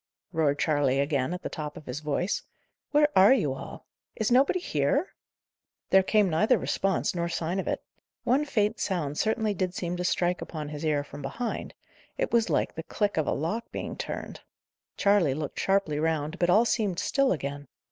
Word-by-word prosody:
roared 150 -3 +2
Charley 145 -3 +2
again, 140 0 0
at 180 - -5
the - - -2
top 150 -1 -6
of 150 - -11
his 125 +3 -4
voice, 155 +6 -1 0.5
"where 295 0 +5
are 195 +7 +8
you 150 - 0
all? 135 - -9 0.3
Is 220 +1 -1
nobody 270 +8 +4
here?" 280 - 0 0.8
There 190 - +7
came 210 +1 +3
neither 215 +9 +3
response 195 -2 0
nor 170 -1 -1
sign 170 +2 -2
of - - -3
it. - - -2 0.4
One 265 +5 +3
faint 215 -6 0
sound 155 -7 -2
certainly 220 -1 +1
did 185 -2 -2
seem 175 -1 -3
to 180 - -2
strike 180 0 +1
upon 150 -3 -5
his 150 +1 -6
ear 150 -2 +1
from 145 - -10
behind; 230 - -4 0.4
it - - -1
was 230 -1 +3
like - - +1
the 160 - -5
click 205 +5 -1
of 155 -3 0
a - - +2
lock 205 +10 -3
being - - -5
turned. - - -6 0.6
Charley 200 -9 +3
looked 150 -1 -4
sharply 190 -6 +1
round, 160 +1 -1
but 175 - +2
all 215 +6 +5
seemed 210 -7 0
still 275 +7 +2
again. 145 -3 -3
175 Hz, 190 wpm, -28 LUFS, 150-210 Hz, 0.8 s, are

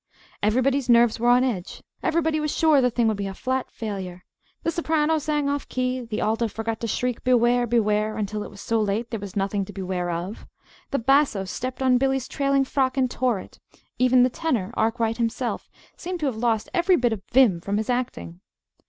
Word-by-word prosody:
Everybody's 255 +5 +1
nerves 235 -1 +5
were 240 +1 +2
on 245 +1 +5
edge, 210 -9 -3 0.2
everybody 320 -2 +1
was 300 0 -1
sure 305 -2 +4
the 250 - +3
thing 235 -1 +1
would 215 -2 0
be 200 -1 -3
a 195 - -6
"flat 260 +3 -2
failure." 190 -5 -6 0.4
The 330 - +1
soprano 320 -1 +1
sang 295 -1 -1
off 285 0 -2
the - - -14
key, 255 0 0
the 230 -3 -4
alto 225 +2 +1
forgot 225 +1 -4
to 230 - -3
shriek 250 +2 -2
"Beware, 245 -1 +3
beware!" 215 -2 +1
until 210 0 -3
it - - -6
was 200 -1 -12
so 225 -1 0
late 215 +3 -1
there 225 - -3
was 200 -2 -8
nothing 195 0 0
to 205 - -10
beware 185 -2 -3
of; 175 +5 -5 0.4
the 275 - 0
basso 270 -5 +2
stepped 255 +7 -4
on 255 -1 +4
Billy's 270 -1 0
trailing 275 -1 +1
frock 265 0 0
and 255 -2 +1
tore 245 -6 0
it; - - -13 0.4
even 255 0 +5
the 250 - +2
tenor, 245 - -2
Arkwright 225 0 0
himself, 235 +1 -2 0.3
seemed 360 0 -5
to - - 0
have 265 -5 -1
lost 225 -1 0
every 360 0 +3
bit 240 -6 +1
of 210 - -5
vim 230 -9 +4
from 200 +3 -2
his 220 - -2
acting. 90 - -3
240 Hz, 205 wpm, -24 LUFS, 210-265 Hz, 0.4 s, nerves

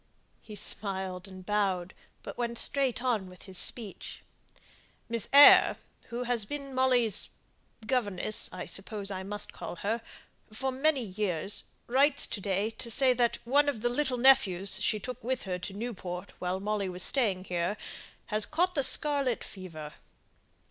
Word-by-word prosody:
He 215 - -10
smiled 190 -2 -3
and 185 -1 -11
bowed, 190 -3 0 0.3
but - - -7
went 235 -1 -3
straight 265 -1 +1
on 220 -7 0
with 180 - -13
his 190 -2 0
speech. 220 -5 -1 0.8
"Miss 230 -2 -2
Eyre, 285 +1 +9 0.3
who 240 +1 -4
has 240 -2 0
been 275 +4 -6
Molly's 250 -5 +2 0.6
governess, 215 -4 -1
I 180 -1 -6
suppose 200 0 -3
I 190 -1 -4
must 205 +2 -5
call - - -7
her 220 +6 -2 0.5
for 265 +5 -2
many 270 0 +1
years, 195 -3 -3 0.2
writes 275 +3 +4
to 205 - -5
day 200 +2 -1
to 225 +1 -6
say 260 +2 +5
that 240 -1 +1
one 285 +4 +3
of 235 -7 -4
the 240 - +1
little 260 0 -1
nephews 205 -8 +4
she 215 - +1
took 250 +3 -7
with 255 +1 -2
her 180 -2 -3
to 185 +2 -7
Newport 190 -5 -6
while 180 +1 -2
Molly 205 -1 -2
was 180 0 -4
staying 210 -9 +1
here, 180 +2 -2 0.5
has 215 -1 +1
caught 355 +4 +1
the 290 - +1
scarlet 275 -2 +2
fever." 160 -6 -9
215 Hz, 155 wpm, -29 LUFS, 190-255 Hz, 0.8 s, Eyre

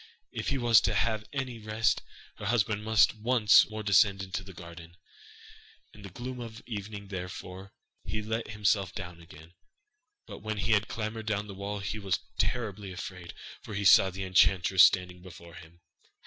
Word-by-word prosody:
If - - -5
he 135 - 0
was 120 -3 +5
to - - 0
have 110 -2 0
any 130 -4 -4
rest, 110 +2 0 0.4
her - - -7
husband 105 -3 +1
must 110 0 +4
once 110 -1 +4
more 110 0 -6
descend 100 -1 +3
into 95 +1 -5
the 95 - -11
garden. 85 -1 -12 1.0
In 105 - -14
the 100 - -9
gloom 125 +6 -7
of 115 -2 -8
evening 100 -2 -7
therefore, 95 0 -7 0.3
he 105 0 -4
let 110 +2 -3
himself 100 -2 0
down 90 -2 -7
again; 80 +1 -15 0.7
but - - -10
when 110 0 -4
he 100 +3 -1
had 105 -1 +3
clambered 110 +1 -5
down 105 -1 -1
the 100 - -9
wall 100 +1 -5
he 110 +2 -4
was 95 -3 0 0.2
terribly 105 -5 -2
afraid, 90 -1 -8 0.3
for 105 - -8
he 100 0 -2
saw 95 0 +7
the 95 +1 -6
enchantress 95 0 +4
standing 90 -1 +3
before 85 -2 -13
him. 85 +2 -14
100 Hz, 175 wpm, -29 LUFS, 95-110 Hz, 1.0 s, saw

